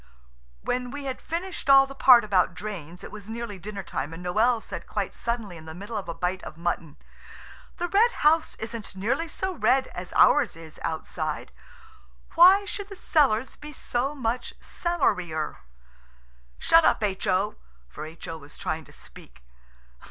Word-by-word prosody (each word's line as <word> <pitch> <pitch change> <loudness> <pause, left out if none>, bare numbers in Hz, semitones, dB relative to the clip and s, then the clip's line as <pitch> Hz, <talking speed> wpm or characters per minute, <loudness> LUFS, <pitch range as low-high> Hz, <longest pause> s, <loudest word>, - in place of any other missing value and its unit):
When 250 0 -1
we 285 +2 -6
had 265 -2 -4
finished 345 -2 -4
all 275 0 +9
the 275 - -10
part 255 -3 +7
about 185 -4 +2
drains 180 -5 -7
it - - -8
was 210 0 -10
nearly 225 -3 -5
dinner 200 +1 -6
time, 155 +4 -4
and 180 +2 -9
Noël 225 +6 +3
said - - -7
quite - - -3
suddenly 230 -7 -3
in 160 - -12
the 160 0 -8
middle 200 +5 -7
of 200 -5 -4
a - - -2
bite 185 +1 -2
of 155 - -9
mutton– 170 -3 -3 0.8
"The 350 - -1
Red 430 +6 +4
House 320 -5 +2
isn't 220 -2 -7
nearly 260 - -1
so 380 +4 -3
red 270 -5 +3
as 180 0 -8
ours - - +5
is 160 -1 -12
outside. 160 -1 -3 0.8
Why 380 +4 +7
should 405 0 -5
the 395 - -8
cellars 265 - +2
be 300 0 -10
so 270 0 -2
much 245 -2 -2
cellarier? 180 - -1 1.0
Shut 330 0 +5
up - - +3
H.O!" 195 0 0 0.3
For 155 - -8
H.O. 160 0 -8
was 145 0 -12
trying 160 -1 -3
to - - -17
speak. - - -13
215 Hz, 165 wpm, -26 LUFS, 175-275 Hz, 1.0 s, all